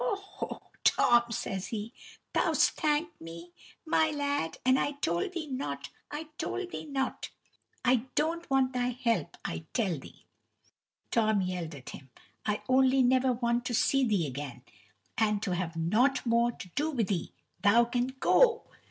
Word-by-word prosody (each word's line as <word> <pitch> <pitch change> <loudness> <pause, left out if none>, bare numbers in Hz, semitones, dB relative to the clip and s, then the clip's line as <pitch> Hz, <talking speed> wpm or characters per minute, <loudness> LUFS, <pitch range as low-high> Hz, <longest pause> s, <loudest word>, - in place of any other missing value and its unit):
"Ho, - - +1
ho, 395 0 -7 0.2
Tom!" 240 -1 +4
says 195 -4 -3
he. 220 +1 -5 0.4
"Thou - - +2
'st - - +4
thanked 305 +2 -1
me, 170 +1 -9 0.3
my 315 0 +3
lad, 285 - -1
and 260 +1 +5
I 290 - 0
told 175 - -1
thee 340 -3 -3
not, 145 - -4 0.2
I 300 +1 -6
told 365 -2 -3
thee - - -5
not!" 270 -2 -2 0.6
"I 250 0 +3
don't 335 +2 0
want 265 -1 +2
thy 250 -1 -1
help, 230 -10 0
I 80 0 -4
tell 190 - 0
thee," - - -15 0.9
Tom 220 -3 +3
yelled 180 -4 -3
at 130 - -9
him 135 - -11 0.4
"I 210 0 -1
only 260 0 +4
want 245 - +4 0.4
never 235 +1 +2
to 245 - -3
see 275 +4 +3
thee 205 -9 +2
again, 130 -2 -6 0.6
and 210 -2 +2
to 185 - -1
have 175 -2 -3
nought 225 +14 +2
more 235 0 +3
to 185 - -10
do 295 - -1
with 230 -9 -1
'ee 175 -4 -2 0.3
thou 225 +4 +6
can 245 +1 0
go." 455 - +3
240 Hz, 165 wpm, -30 LUFS, 180-275 Hz, 0.9 s, thou